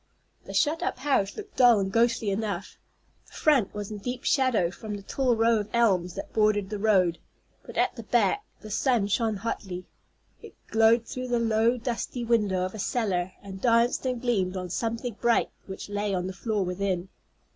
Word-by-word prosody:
The - - -8
shut 315 +2 +2
up - - -2
house 260 -7 0
looked 420 -1 -9
dull 245 -3 +7
and 195 -1 -1
ghostly 230 -1 +2
enough. 200 -2 -3 0.5
The - - -20
front 280 -10 +3
was 205 0 -5
in 210 - -5
deep 245 +4 -5
shadow 250 -11 +2
from 210 +2 -6
the 200 - -8
tall 255 +3 +1
row 225 0 +3
of 205 0 -5
elms 190 -7 +2
that - - -7
bordered 210 -2 +2
the 210 - -3
road, 190 -5 +3 0.4
but - - -11
at - - +2
the - - -7
back 410 - +1 0.2
the 215 - -9
sun 240 -1 +2
shone 220 +2 0
hotly. 190 -3 -4 0.6
It - - -13 0.2
glowed 225 +1 +4
through 255 +1 -5
the 245 -1 +1
low, 230 +1 +2
dusty 240 0 -3
window 210 -6 +2
of 185 - -5
a 215 - -7
cellar, 190 -5 -1
and 190 -1 -9
danced 235 0 +3
and 250 -1 -1
gleamed 195 -7 0
on 180 -1 -5
something 230 +2 -3
bright 235 -1 +2 0.2
which 190 - -7
lay 205 -1 -1
on 180 -1 -2
the 190 - -4
floor 200 +2 -1
within. 185 0 -2
215 Hz, 190 wpm, -27 LUFS, 195-235 Hz, 0.6 s, dull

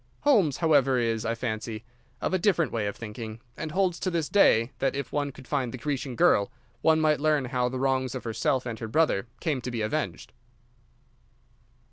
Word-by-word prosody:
Holmes, 205 - +3
however, 140 -6 +3
is, 115 -2 0
I 115 0 0
fancy, 110 -1 -4 0.4
of - - -1
a 185 - +2
different 175 -4 +2
way 110 -3 -1
of 100 - -4
thinking, 110 0 -7 0.2
and 155 - -5
holds 185 0 +1
to 185 - -1
this 165 -4 -1
day 120 - +4
that, 135 - 0
if 140 -3 -4
one 145 -1 -1
could 130 -1 -14
find 135 -5 -1
the 130 - -6
Grecian 135 0 -3
girl, 100 -2 +3 0.3
one 160 -1 +4
might 155 -1 +3
learn 150 -2 +2
how 125 -1 0
the 130 - -4
wrongs 130 -1 0
of 130 - -5
herself 115 +3 0
and 115 -3 -5
her 110 - -4
brother 120 -4 +1
came 150 -7 -1
to 125 - -4
be 115 -3 -2
avenged. 110 - -3
130 Hz, 195 wpm, -27 LUFS, 115-155 Hz, 0.4 s, day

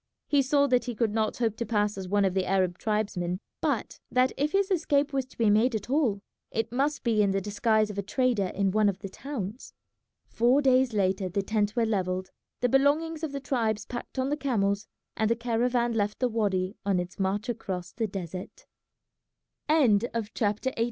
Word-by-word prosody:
He 285 -1 +3
saw 280 +2 +3
that 250 -3 +2
he 245 -2 -4
could 220 -2 0
not 220 -1 0
hope 225 -3 0
to 235 - -2
pass 210 -2 +1
as 190 -1 -6
one 200 +1 +2
of 190 - +1
the 190 -1 0
Arab 185 -2 +1
tribesmen, 200 -5 -1 0.2
but - - -1
that 255 +1 +3
if 290 +2 0
his 395 0 +1
escape 295 -5 +1
was 265 -2 -1
to - - -20
be 225 -3 +3
made 225 +3 +3
at 215 +3 -4
all 240 -9 +1 0.3
it 225 0 -2
must 280 +4 0
be 225 -3 +2
in 200 - +3
the 195 0 +1
disguise 215 +2 +1
of 200 - -5
a - - +1
trader 210 -1 +1
in 195 +1 0
one 210 +1 +3
of 190 - -3
the 195 - -7
towns. 235 -2 -6 0.5
Four 245 +4 +3
days 260 -2 +4
later 190 -2 +1
the 195 +2 -1
tents 210 0 0
were 235 -2 +2
levelled, 185 -3 -1 0.3
the 245 - +3
belongings 305 +5 +2
of 315 - -2
the 280 - -4
tribes 225 -5 -1
packed 240 +2 -7
on 260 +2 0
the 295 - 0
camels, 210 -7 0 0.3
and 220 0 +1
the 230 - +3
caravan 240 +1 0
left 210 -1 0
the 255 - +1
wady 200 -3 0
on 200 -2 +1
its 180 +2 -4
march 200 +4 -1
across 190 -7 -4
the 225 +2 -2
desert. 190 - -7 1.0
CHAPTER 230 -4 +1
XIX. - - -8
220 Hz, 200 wpm, -28 LUFS, 200-255 Hz, 1.0 s, days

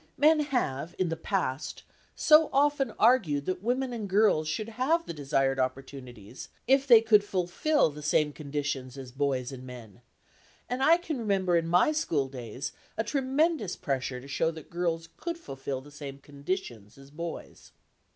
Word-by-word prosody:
Men 310 +1 +5
have 175 - -2
in 185 -2 0
the 165 - -1
past 160 -5 -3 0.3
so 310 0 +5
often 280 -1 +2
argued 165 - +3
that 185 -1 -2
women 250 +3 -1
and 215 -4 -5
girls 190 -6 +3
should 215 +8 -3
have 280 +9 0
the - - -5
desired 135 -2 0
opportunities, 130 -4 -5 0.2
if 270 +2 +3
they 235 -4 +8
could 215 -2 +5
fulfil 190 - +1
the 150 +1 -10
same 150 0 +1
conditions 140 -3 -4
as 130 -2 -8
boys 135 -1 -1
and 130 -1 -9
men, 120 -3 -11 0.7
and 250 +2 -3
I 325 +5 +6
can 320 -6 -4
remember 195 -5 +1
in 165 -1 +1
my 180 - +4
schooldays 135 - -3 0.3
a 225 - +1
tremendous 270 - 0
pressure 135 -5 -3
to 130 - -12
show 160 +3 0
that 160 -2 -10
girls 170 -1 -2
could 335 +1 -4
fulfil 135 - -6
the 145 +2 -15
same 140 -2 -8
conditions 140 - -6
as 135 0 -15
boys. 170 +2 -8
165 Hz, 160 wpm, -28 LUFS, -, 0.7 s, they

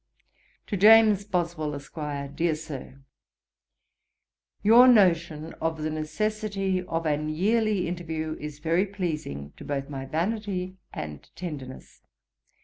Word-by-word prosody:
'To 205 - -2
JAMES 215 0 +7
BOSWELL, 170 -6 -1
ESQ. 140 -1 -6
'DEAR 165 -1 +1
SIR, 140 -3 -9 1.6
'Your 235 +4 +8
notion 170 -8 +3
of 160 -1 -1
the 155 - -1
necessity 195 +4 -1
of 165 -2 -2
an 150 0 0
yearly 205 +3 +1
interview 160 -2 -3
is 150 -1 -6
very 165 +6 +1
pleasing 155 - -4
to - - -10
both 140 -1 -3
my 135 -2 -5
vanity 185 +2 -2
and 75 -2 -7
tenderness. 145 -7 -8
165 Hz, 115 wpm, -27 LUFS, 150-195 Hz, 1.6 s, Your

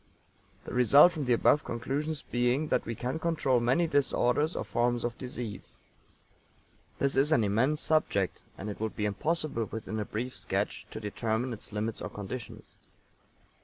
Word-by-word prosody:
The - - -7
result 130 +7 +7
from 155 -5 -4
the 125 - +3
above 145 +5 +4
conclusions 140 +5 -3
being 125 +5 0
that - - +1
we 115 - -3
can 125 +8 -3
control 160 -7 +1
many 125 +9 +2
disorders 145 0 +1
or - - -2
forms 120 0 0
of 120 -1 -2
disease. 120 -4 -7 1.2
This 140 -1 +1
is 140 +3 +3
an 135 -8 +4
immense 120 +9 +1
subject, 100 - +1 0.2
and 95 - -6
it 105 - -5
would 110 0 -3
be 105 - -1
impossible 145 - -1
within 110 0 -5
a 105 - -2
brief 120 +6 -4
sketch - - -2
to - - -7
determine 110 +3 -2
its 110 - -10
limits 105 +1 -3
or - - -4
conditions. 105 +4 -8
125 Hz, 165 wpm, -30 LUFS, 110-145 Hz, 1.2 s, result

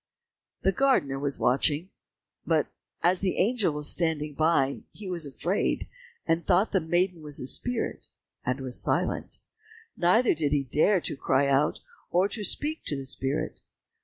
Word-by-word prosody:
The 195 - +3
gardener 225 - +1
was 140 -1 -1
watching; 145 +7 +1 0.5
but - - +1 0.4
as 180 +1 +3
the 190 -2 -1
angel 215 -2 +2
was 150 0 0
standing 155 -3 +1
by, 145 -3 +1
he 205 - -10
was 170 -5 -3
afraid 175 +8 -1 0.4
and 165 +1 +1
thought 190 +3 +2
the 190 - +3
maiden 175 +1 0
was 150 -2 -2
a - - -5
spirit, 245 - 0 0.4
and 125 +2 -2
was 130 -2 +1
silent, - - -1 0.5
neither 205 +8 +3
did 150 -3 -1
he 145 -2 +2
dare 165 - +2
to - - -2
cry 140 0 +1
out, 140 +2 +1 0.3
or 180 +3 +2
to 210 0 -4
speak 300 - 0
to 145 - -1
the 135 -1 -5
spirit. 135 +1 -3
160 Hz, 160 wpm, -27 LUFS, 140-190 Hz, 0.5 s, The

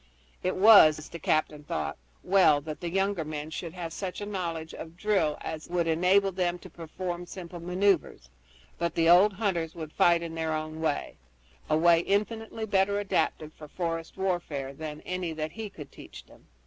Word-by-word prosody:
It 185 - -1
was, 185 -7 +7
the 170 - -8
captain 155 -1 0
thought, - - -3 0.3
well 185 -6 +5
that 155 +1 -7
the 175 - -3
younger 195 -1 0
men 155 0 -6
should 165 +1 -5
have 170 -3 -6
such 185 -1 -5
a 205 - -4
knowledge 170 -5 -4
of 165 +1 -9
drill 190 -7 +1
as 160 0 -6
would 175 -1 0
enable 180 +4 +3
them 180 -1 -1
to - - -13
perform 175 +1 -6
simple 175 -1 -8
maneuvers, 180 - 0 0.5
but 170 0 -1
the 165 0 +3
old 185 +5 +7
hunters 180 -6 -2
would 155 -2 -7
fight 170 -1 +4
in 165 -1 -6
their 160 -1 -2
own 155 0 -4
way 155 -3 -2 0.5
a 155 - +3
way 170 +1 +5
infinitely 220 +4 -1
better 200 0 +2
adapted 185 -6 -1
for 155 - -12
forest 165 0 -4
warfare 170 -8 -2
than 150 +1 -7
any 180 -2 -3
that 155 0 -4
he 220 +2 -6
could 150 -7 -11
teach - - -12
them. - - -20
170 Hz, 180 wpm, -28 LUFS, 160-190 Hz, 0.5 s, was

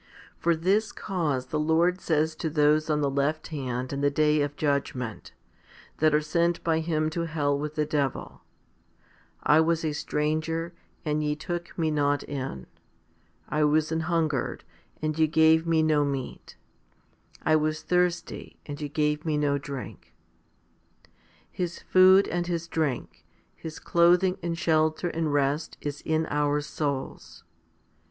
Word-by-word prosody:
For 170 0 +2
this 195 +7 +1
cause 155 -10 -2
the 150 +4 -3
Lord 165 +4 +2
says 155 0 +1
to 160 - -2
those 150 0 +2
on 150 -1 +1
the 145 - +2
left 145 +3 -1
hand 130 -4 -4
in 140 - -3
the 145 - +3
day 150 +1 +2
of 145 0 -2
judgment, 140 -6 -2 0.7
that 155 0 +4
are 150 - +3
sent 170 +2 0
by 160 -1 +2
Him 155 -1 0
to 170 +1 -2
hell 145 -3 0
with 150 +2 -4
the 150 - +1
devil, 145 -3 -2 0.6
/ - - -31
was 160 +2 +4
a 155 - -1
stranger, 155 +3 -2 0.3
and 150 0 0
ye 150 0 0
took 175 +2 -6
Me 160 -2 +1
not 145 -1 +1
in; 130 - -5 0.8
I 150 0 0
was 155 +1 +2
an 160 - 0
hungered, 160 -4 -1 0.4
and 155 0 -1
ye 160 - +5
gave 160 +1 +4
Me 160 -1 +3
no 155 -2 +3
meat; 135 -3 -5 0.9
1 155 -1 +3
was 155 0 -1
thirsty, 180 -1 -1
and 145 0 -7
ye 145 - -3
gave 150 +1 0
me 155 -2 0
no 145 -1 +1
drink? 140 -2 -8 1.4
His 175 -2 -3
food 185 +1 +5
and 175 0 -2
His 170 -1 -2
drink, 155 -7 -3 0.3
His 160 -1 -8
clothing 180 +2 +3
and 170 -1 -3
shelter 160 +1 +1
and 160 -2 -1
rest 145 +2 0
is 145 0 -5
in 160 0 0
our 145 0 +1
souls. 145 -2 -4
155 Hz, 150 wpm, -27 LUFS, 145-165 Hz, 1.4 s, ye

